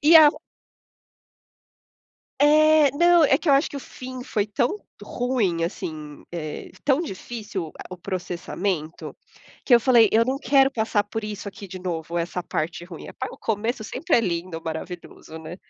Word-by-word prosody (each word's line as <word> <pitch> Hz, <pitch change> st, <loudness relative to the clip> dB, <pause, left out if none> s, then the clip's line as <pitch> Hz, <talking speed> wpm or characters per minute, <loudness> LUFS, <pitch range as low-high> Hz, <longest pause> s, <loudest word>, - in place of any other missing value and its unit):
E 310 Hz, +3 st, +6 dB
a 315 Hz, -2 st, +10 dB, 2.1 s
É, 305 Hz, 0 st, +6 dB
não 345 Hz, +1 st, +5 dB
é 270 Hz, -1 st, +4 dB
que 335 Hz, -, -4 dB
eu -, -, +6 dB
acho 275 Hz, +3 st, +4 dB
que -, -, -6 dB
o 280 Hz, -, -5 dB
fim 255 Hz, 0 st, -8 dB
foi 205 Hz, -1 st, -1 dB
tão 240 Hz, -, 0 dB, 0.3 s
ruim, 230 Hz, -10 st, -1 dB
assim, 155 Hz, -4 st, -6 dB
eh 155 Hz, -3 st, -6 dB
tão 275 Hz, +1 st, +3 dB
difícil 210 Hz, -, -5 dB, 0.2 s
o 185 Hz, -, -6 dB
processamento 180 Hz, -2 st, -4 dB, 0.5 s
que 245 Hz, -, +6 dB
eu 235 Hz, -, +6 dB
falei, 235 Hz, -3 st, +5 dB
eu 225 Hz, +1 st, +5 dB
não 265 Hz, +2 st, -1 dB
quero 270 Hz, 0 st, +4 dB
passar 220 Hz, -4 st, 0 dB
por 225 Hz, +1 st, -5 dB
isso 205 Hz, -1 st, -5 dB
aqui 195 Hz, +1 st, -10 dB
de 185 Hz, 0 st, -7 dB
novo, 170 Hz, -2 st, -4 dB
essa 175 Hz, +1 st, -3 dB
parte 170 Hz, +2 st, -3 dB
ruim, 175 Hz, -2 st, -10 dB
é -, -, -8 dB
pa 260 Hz, -, -5 dB
o -, -, -12 dB
começo 225 Hz, +2 st, -2 dB
sempre 325 Hz, +8 st, 0 dB
é -, -, +4 dB
lindo, 170 Hz, -4 st, -3 dB
maravilhoso, 160 Hz, 0 st, -7 dB
né. 160 Hz, +2 st, -8 dB
210 Hz, 170 wpm, -24 LUFS, 175-265 Hz, 2.1 s, a